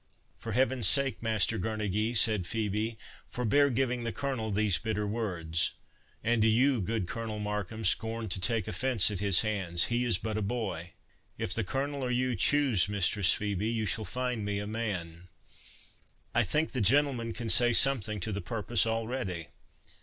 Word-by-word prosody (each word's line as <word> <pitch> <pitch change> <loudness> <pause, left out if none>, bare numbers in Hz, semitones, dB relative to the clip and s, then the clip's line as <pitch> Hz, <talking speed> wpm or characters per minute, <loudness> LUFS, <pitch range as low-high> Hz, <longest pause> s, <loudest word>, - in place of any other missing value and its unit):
"For 115 - -6
Heaven's 130 0 +2
sake, 140 -1 +1
Master 110 -1 +1
Girnegy," 110 +1 -1
said 105 -5 +3
Phœbe, 110 +2 -2 0.3
"forbear 140 +4 +2
giving 125 -1 -1
the 115 - -2
Colonel 130 -6 -3
these 105 -2 +3
bitter 105 -1 -2
words! 90 -7 -1 0.5
And 115 0 +1
do 110 - +4
you, 125 +2 +3
good 110 0 -2
Colonel 115 0 -4
Markham, 105 +1 -4
scorn 110 +4 0
to 100 - -3
take 110 +3 0
offence 115 +1 +2
at 100 - -3
his 100 -3 +3
hands—he 105 +2 0
is 120 -6 +2
but 110 +3 -4
a - - -3
boy." 100 -6 -4 0.4
"If - - 0
the - - +1
Colonel 140 +7 -3
or 125 - -2
you 125 0 0
choose, 125 -4 +3
Mistress 100 -1 +3
Phœbe, 105 +1 -2
you 110 -2 -1
shall 105 +3 0
find 125 +2 -3
me 100 0 -2
a 100 - -3
man—I 90 -6 -6
think 155 +2 0
the 130 - -1
gentleman 125 +1 +2
can 115 0 -6
say 120 +1 +4
something 115 -5 +2
to 110 - -2
the 100 0 -3
purpose 110 +4 0
already. 110 - -3
110 Hz, 165 wpm, -29 LUFS, 100-120 Hz, 0.5 s, do